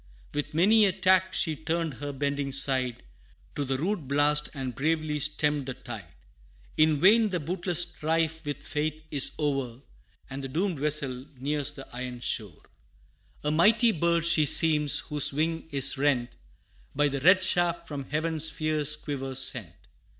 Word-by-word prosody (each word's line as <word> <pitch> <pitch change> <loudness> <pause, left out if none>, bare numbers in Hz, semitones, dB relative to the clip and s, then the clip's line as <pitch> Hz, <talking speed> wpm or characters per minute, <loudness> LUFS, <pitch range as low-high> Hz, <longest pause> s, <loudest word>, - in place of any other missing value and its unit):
With 145 +1 -4
many 210 +6 +5
a 195 - +2
tack 185 +1 +2
she 160 -4 -1
turned 160 0 -3
her 145 0 -5
bending 140 0 -3
side 130 -2 -1 0.5
To 145 - -2
the 135 -1 -2
rude 170 0 -3
blast, 145 +2 +1
and 130 -2 -5
bravely 155 +3 -1
stemmed 150 -1 -1
the 130 - -5
tide. 100 -7 -9 0.7
In 155 -1 +3
vain! 215 +5 +5
the 180 -2 -2
bootless 175 +2 0
strife 160 -1 -2
with 145 -1 -6
fate 155 +1 -3
is 140 -3 +3
o'er 135 -5 -2 0.5
And 135 +1 -7
the - - -3
doomed 170 +3 -2
vessel 140 -3 0
nears 145 +2 -1
the 140 -2 -10
iron 125 -1 -6
shore. 105 -8 -3 0.8
A 150 - 0
mighty 220 +9 +4
bird, 170 -1 0
she 165 -3 +3
seems, 150 -2 +5
whose 150 -1 +2
wing 160 +3 -2
is 140 -2 +1
rent 130 -4 0 0.6
By 145 +1 +2
the 140 -1 -4
red 185 +4 +5
shaft 175 -1 +2
from 140 -3 -6
heaven's 160 +1 0
fierce 155 -2 +1
quiver 135 -3 -6
sent. 120 -8 +2
150 Hz, 160 wpm, -27 LUFS, 135-165 Hz, 0.8 s, many